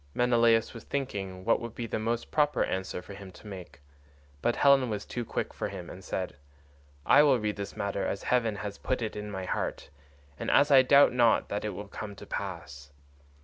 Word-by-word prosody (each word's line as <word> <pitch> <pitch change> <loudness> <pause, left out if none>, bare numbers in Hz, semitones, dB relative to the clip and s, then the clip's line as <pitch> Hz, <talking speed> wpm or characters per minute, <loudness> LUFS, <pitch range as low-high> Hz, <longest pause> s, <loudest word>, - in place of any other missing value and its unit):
Menelaus 115 -2 +3
was 115 - -9
thinking 95 -9 -4
what 115 - +3
would 115 -1 -7
be 120 - -4
the 110 - -3
most 115 +2 -2
proper 150 -1 +2
answer 95 -1 -3
for 100 - -10
him 100 -1 -10
to - - -16
make, 90 -8 -10 0.6
but 120 - +1
Helen 140 -3 +4
was 105 -1 -3
too 120 - -4
quick - - -3
for - - -3
him 90 -3 -8
and 95 - -11
said, 95 -6 -4 0.7
"I - - +7
will 140 -3 +5
read 105 -2 -2
this 100 -1 -6
matter 100 -1 -2
as 100 - -3
heaven 115 -4 +1
has 100 0 -6
put 125 -2 -1
it 110 - -4
in 105 0 -5
my 95 -2 -5
heart, 75 - -3 0.5
and - - -3
as 145 +1 +4
I 135 -2 +9
doubt 140 +1 +6
not 120 -2 +3
that 100 - -2
it 105 -3 -3
will 105 +2 -7
come 100 0 -7
to - - -11
pass. 85 -8 -6
105 Hz, 210 wpm, -29 LUFS, 95-120 Hz, 0.7 s, I